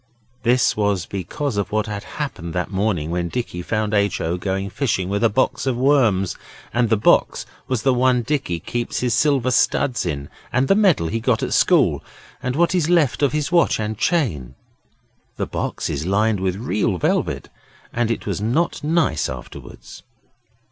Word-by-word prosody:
This 125 +1 +3
was 100 -4 0
because 100 - -4
of 100 -2 -2
what 110 0 0
had 105 -2 -5
happened 95 - -4
that 90 +2 -2
morning 95 -5 -1
when 85 0 -1
Dicky 100 -5 -4
found 110 +3 -2
H. 100 -2 +1
O. 85 +2 -1
going 95 +2 -2
fishing 95 -10 -1
with 100 +3 -1
a 115 - +5
box 130 +4 0
of 125 -2 0
worms, 120 - +2 0.4
and 120 -1 +2
the 110 - +3
box 105 - +2 0.2
was 130 -5 -1
the 135 - +3
one 125 -1 +2
Dicky 130 - -1
keeps 120 +8 -3
his 125 -2 +1
silver 130 0 +2
studs 125 0 +1
in, 70 -5 -3 0.2
and 130 +2 +1
the - - +5
medal 195 - +3
he 115 - -1
got 120 -1 0
at - - -1
school, - - +3 0.4
and 125 0 -2
what 170 +3 +2
is 170 -3 +1
left 160 -8 +2
of 145 - +3
his 150 +1 -2
watch 170 -9 +3
and 110 0 -2
chain. 100 - -1 0.8
The - - -1
box - - -3
is - - -3
lined 105 +2 +2
with 95 -1 -1
red 100 -2 -1
velvet 70 -3 -1 0.4
and 120 -1 0
it 115 - -2
was 100 -1 -3
not 145 +12 0
nice 155 - +1
afterwards. 65 -1 -10
110 Hz, 180 wpm, -21 LUFS, 95-130 Hz, 0.8 s, a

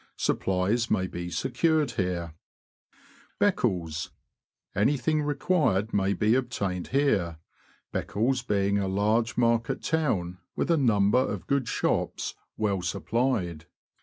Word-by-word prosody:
Supplies 95 +6 0
may 95 -3 +1
be 85 -1 -5
secured 135 - +1
here. 90 -6 -2 1.1
Btccles. 90 - 0 0.3
— - - -58
Anything 145 +8 +2
required 145 - +1
may 100 0 +2
be 105 +2 +2
obtained 100 -8 -1
here, 105 - +1 0.6
Beccles 125 +5 0
being 100 -3 +1
a 100 - -1
large 105 +4 +1
market 115 -1 +1
town, 100 - 0 0.2
with - - 0
a - - +5
number 110 -4 +3
of 130 - -2
good 140 -4 0
shops, - - -1 0.2
well 100 -3 0
supplied. 90 - -1
110 Hz, 115 wpm, -27 LUFS, 95-130 Hz, 1.1 s, a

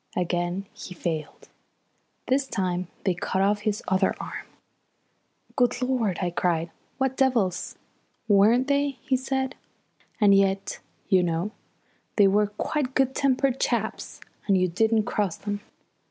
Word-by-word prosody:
Again 175 +2 -1
he 180 - -9
failed. 160 -3 -4 0.8
This 270 +1 +2
time 180 -5 -1 0.2
they 190 - +2
cut 190 +2 -1
off 205 +1 +2
his 210 0 -2
other 190 0 +2
arm. - - -7 1.1
"Good 245 -2 +2
Lord," 250 -7 0
I 175 - 0
cried. 170 -1 0 0.3
"What 265 -1 0
devils!" 230 -10 +1 0.5
"Weren't 220 +5 +5
they!" 280 -1 +1
he 270 -2 +1
said. 265 0 -1 0.7
"And 205 -3 +6
yet, 195 0 +1 0.3
you 190 -3 +4
know, 170 +3 -1 0.6
they 205 -2 +6
were 205 +2 +3
quite 260 +6 -2
good 265 -1 +2
tempered 270 -1 +1
chaps - - -2 0.3
when 200 - +4
you 185 -1 +3
didn't 220 +5 +2
cross 205 -5 -1
them. 205 0 -4
205 Hz, 135 wpm, -26 LUFS, 185-255 Hz, 1.1 s, And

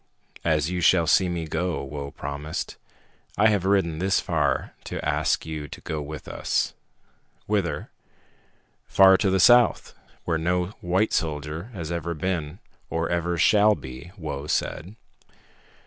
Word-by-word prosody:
"As 80 0 +1
you 90 -1 -2
shall 85 0 +4
see 90 +2 +3
me 85 -2 -3
go," 80 +2 -2
Whoa 70 0 -6
promised. 70 +2 -5 0.6
"I 110 +3 +5
have 100 -4 +1
ridden 95 -5 +1
this 95 +2 +2
far - - 0
to - - -5
ask - - +1
you 80 -2 -5
to 75 - -10
go 80 -4 -4
with 75 0 -8
us." - - -1 0.7
"Whither?" 100 -5 -1 1.0
"Far 95 -1 +7
to 100 - +1
the 95 0 +2
south, 120 +5 +5 0.3
where 80 -2 0
no 90 +2 0
white 95 +5 +1
soldier 75 +5 -2
ever 85 -2 -4 0.2
has 80 - -11
been 85 -2 -2 0.3
or 80 +1 -1
ever 85 0 0
shall 105 +4 +5
be," 65 +5 -10
Whoa 75 -4 -5
said. 90 +6 -2
85 Hz, 145 wpm, -25 LUFS, 75-95 Hz, 1.0 s, Far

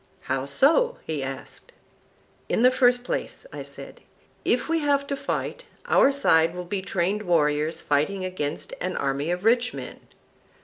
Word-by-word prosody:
How 135 0 -2
so? 330 - +3
he 155 -3 -3
asked. 135 0 -8 0.8
In 230 - +1
the 255 - +7
first 245 -1 +3
place, 250 - -4
I - - -6
said, - - -9 0.4
if - - +1
we 330 0 +1
have 285 -2 +1
to 280 - -3
fight, - - -4 0.2
our 275 - +5
side 165 -12 +3
will 180 0 -5
be 190 +2 -3
trained 195 +2 -1
warriors 155 -4 +1
fighting 155 +7 0
against 185 - -4
an - - -2
army 140 +3 -1
of 180 +3 -2
rich 240 +2 +3
men. - - -8
185 Hz, 160 wpm, -25 LUFS, 155-255 Hz, 0.8 s, the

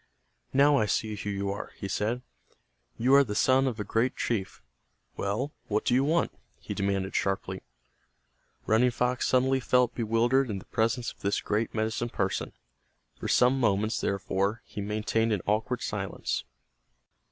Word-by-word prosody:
"Now 140 +2 +5
I 110 - +2
see 110 +2 -1
who 105 0 -5
you 100 0 -2
are," 100 - -6
he 100 - -5
said, 115 +5 -1 0.7
"You 125 +4 +3
are 140 0 +8
the 105 -6 -4
son 130 +3 +4
of 120 -4 -3
a - - -1
great 115 +5 0
chief. 100 - -3 0.5
Well, 110 +9 -2 0.2
what 105 0 0
do - - +2
you 130 +2 +4
want?" 165 +4 +2 0.3
he - - -6
demanded, 100 -1 -1
sharply. 95 -1 -1 1.0
Running 115 +3 +4
Fox 125 +1 0
suddenly 130 +1 +3
felt 125 -1 +2
bewildered 120 +3 +2
in 100 - -2
the 95 - -10
presence 115 +2 0
of - - -19
this 100 0 0
great 110 +2 -1
medicine 110 +2 -1
person. 95 -4 -2 0.7
For - - -4
some 125 +2 +4
moments, 110 -1 +1
therefore, 100 +2 -1
he 105 - -6
maintained 110 +2 0
an 100 - -2
awkward 110 +4 0
silence. 95 -3 -3
110 Hz, 160 wpm, -28 LUFS, 100-125 Hz, 1.0 s, are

